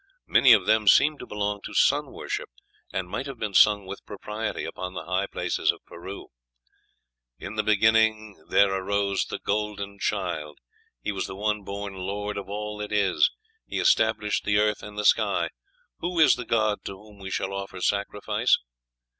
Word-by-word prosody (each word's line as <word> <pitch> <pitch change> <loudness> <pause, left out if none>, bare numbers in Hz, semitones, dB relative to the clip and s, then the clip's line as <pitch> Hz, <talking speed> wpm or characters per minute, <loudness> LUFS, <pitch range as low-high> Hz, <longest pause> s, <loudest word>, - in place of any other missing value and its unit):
Many 130 - +6
of 100 -4 +4
them 110 0 +2
seem 145 +7 +5
to - - -8
belong 105 -1 -2
to - - -8
sun - - +3
worship, - - -5 0.4
and 95 -1 -3
might 135 +9 -4
have 135 -2 -7
been 105 -2 -3
sung 105 0 +5
with 95 +1 -8
propriety 105 +2 -5
upon 90 0 -6
the 80 - -5
high 95 +3 0
places - - 0
of - - -16
Peru: 95 +4 -9 1.1
"In 100 - -7
the 110 - +1
beginning 110 -3 +2
there 100 -1 +4
arose 100 +1 0
the - - -5
golden 100 -1 -3
child. 85 -7 -2 0.5
He - - -1
was 100 - -3
the 95 - -7
one 105 +1 -1
born 100 0 -6
Lord 100 +2 -4
of 100 -1 -6
all 105 +1 -4
that 105 0 -5
is. 105 - +3 0.4
He - - -4
established 110 -2 +2
the 105 0 +2
earth 105 0 +2
and 105 0 -10
the 105 - -2
sky. - - +3 0.5
Who 175 0 -2
is 155 - +7
the 125 - -4
god 110 -2 +1
to - - -4
whom 105 +1 -15
we 95 -1 -7
shall 95 +1 -2
offer 100 -1 -5
sacrifice? 105 +4 +1
105 Hz, 180 wpm, -26 LUFS, 100-105 Hz, 1.1 s, is